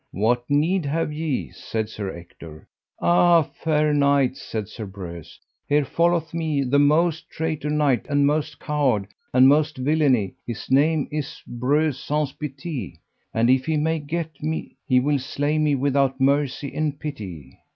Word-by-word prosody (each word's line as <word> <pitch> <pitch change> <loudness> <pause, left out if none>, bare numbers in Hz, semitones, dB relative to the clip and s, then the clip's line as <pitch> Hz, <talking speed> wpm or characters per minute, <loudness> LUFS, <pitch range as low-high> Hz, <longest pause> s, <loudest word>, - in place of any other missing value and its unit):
What 120 +5 0
need 155 +3 +2
have 155 +1 -1
ye? 145 - -2
said 110 -1 -4
Sir 105 -2 -5
Ector. 85 -3 -11 0.4
Ah, 175 -1 +5
fair 150 +1 0
knights, 140 -2 +2
said 110 -3 -4
Sir 110 -3 -7
Breuse, 90 -4 -9 0.3
here 145 0 +3
followeth 170 +1 +1
me 155 -4 0
the 135 +2 +2
most 160 +3 +2
traitor 155 -2 -3
knight, 150 -4 +1
and 145 -1 +3
most 150 +1 0
coward, 135 -9 0 0.3
and 130 +1 +6
most 150 +2 +3
of 130 - -4
villainy; 140 -10 +2
his 120 +1 -6
name 150 +2 +3
is 150 -2 -5
Breuse 135 +3 0
Saunce 150 -1 -1
Pité, 140 - -6 0.4
and 115 +1 +2
if 130 +2 +3
he 160 -1 +1
may 160 +2 0
get 155 0 -5
me 155 +1 -3
he 130 -1 +4
will 145 +2 +1
slay 145 +3 -1
me 150 -2 +2
without 135 0 +1
mercy 140 0 +1
and 150 -2 -2
pity. 95 - -7
145 Hz, 160 wpm, -23 LUFS, 125-155 Hz, 0.4 s, and